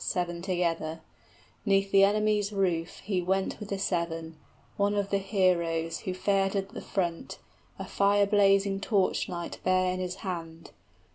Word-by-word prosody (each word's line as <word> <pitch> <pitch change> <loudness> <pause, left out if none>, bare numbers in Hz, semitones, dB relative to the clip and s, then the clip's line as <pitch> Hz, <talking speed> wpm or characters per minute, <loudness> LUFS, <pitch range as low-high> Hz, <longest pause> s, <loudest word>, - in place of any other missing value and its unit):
} - - -4
Seven 175 -1 -2
together; 170 -3 -1 0.6
'neath 195 -1 +2
the 195 0 +6
enemy's 210 0 +2
roof 180 -5 -1
he 190 -2 -1
Went 190 +2 -1
with 210 - -8
the 200 - -2
seven; 170 -4 -2 0.4
one 205 +1 +1
of 200 -1 -1
the 200 - +2
heroes 175 -4 +1
65 - - -14
Who 185 - -1
fared 195 -1 +1
at 195 0 -1
the - - -8
front, 175 -4 -3 0.4
a - - -5
fire 200 0 +3
blazing 200 -1 +3
torch 200 -3 +1
light 175 -1 -5
Bare 185 0 +2
in 185 - -4
his 180 -1 -3
hand. 165 -3 -6
190 Hz, 165 wpm, -28 LUFS, 175-200 Hz, 0.6 s, the